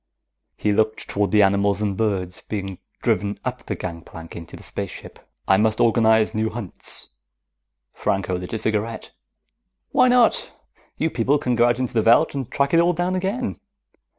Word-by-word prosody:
He 105 - +1
looked 110 +1 0
toward 100 0 0
the 105 -1 +5
animals 100 +1 +2
and 105 -2 -1
birds 95 -4 -1
being 95 -3 -5 0.2
driven 105 -3 0
up 125 0 -4
the 105 - -2
gangplank 85 -1 -8
into 85 -1 -9
the - - -13
spaceship. - - -7 0.3
"I 95 - +5
must 110 +1 +2
organize 110 -1 +4
new 110 +1 0
hunts." 110 -5 -4 0.8
Franco 95 -1 -1
lit 90 0 -6
a - - 0
cigarette. 110 +1 -2 0.8
"Why - - +5
not? 245 -1 +3 0.4
You 160 - 0
people 130 +5 +2
can 125 -3 -1
go 120 0 +4
out 120 -1 +2
into 130 -2 -2
the 115 - +3
veldt 120 +8 +4
and 135 -4 -4
track 140 +2 0
it 165 - +6
all 175 +1 +4
down 175 +2 -1
again. 195 +7 -2
110 Hz, 170 wpm, -22 LUFS, 100-125 Hz, 0.8 s, it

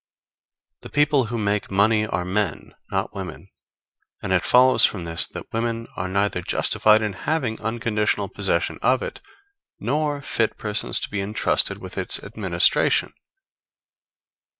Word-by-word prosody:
The - - -10
people 145 -3 +2
who 115 +2 -4
make 105 -1 -1
money 105 +2 +2
are 90 -2 -2
men, 95 -2 -2 0.2
not 95 +2 -2
women; 95 -5 -8 0.7
and 95 - -1
it 95 - +3
follows 130 +1 +5
from 95 -5 +2
this 85 0 0
that - - -10
women 115 0 -2
are 90 - -3
neither 100 -1 0
justified 110 +4 +3
in 105 -2 -2
having 125 0 -2
unconditional 110 -2 -1
possession 95 -4 -1
of 130 +2 +2
it, - - -6 0.6
nor 145 +5 -1
fit 110 -4 -1
persons 105 -2 +1
to - - -3
be 100 -1 -2
entrusted 105 +3 0
with - - -7
its - - 0
administration. - - +1
105 Hz, 140 wpm, -23 LUFS, 95-115 Hz, 0.7 s, follows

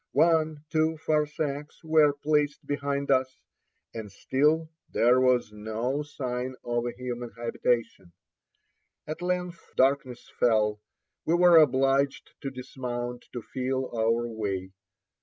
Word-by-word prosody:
One, 155 -2 +2
two 160 0 +1
farsaks 150 -1 -1
were 155 -2 +5
placed 145 0 0
behind 140 -1 -1
us, 130 0 +1 0.6
and 110 -3 -7
still 150 +10 +1 0.2
there 125 +2 +4
was 125 -4 +3
no 110 +6 -2
sign 130 -3 -4
of 120 0 -1
a - - -2
human 125 -1 -5
habitation. 115 -5 -1 0.9
At 155 +3 -6
length 180 -1 -2
darkness 130 -2 +1
fell; 105 -3 +2 0.4
we 165 - +2
were 175 -1 +7
obliged 135 -1 +3
to 135 - -3
dismount 125 -2 -5
to 120 -3 -5
feel 130 +2 -2
our 115 +1 +1
way. 100 -4 -3
130 Hz, 120 wpm, -27 LUFS, 120-150 Hz, 0.9 s, were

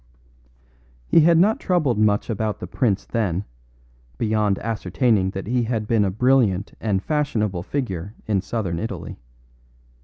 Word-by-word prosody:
He 165 - +4
had 165 +1 +5
not 205 +6 +4
troubled 155 - +1
much 105 -1 +2
about 110 -2 -2
the - - -5
prince 100 +1 0
then, 100 -4 -1 0.7
beyond 105 -2 +1
ascertaining 110 -1 0
that 95 0 -5
he 125 +4 0
had 110 -2 -2
been 110 -2 +3
a - - +1
brilliant 110 -3 +2
and 100 -3 0
fashionable 110 - -1
figure 100 - -4
in 100 -4 +1
southern 95 -6 -3
Italy. 95 - -6
105 Hz, 140 wpm, -22 LUFS, 95-125 Hz, 0.7 s, had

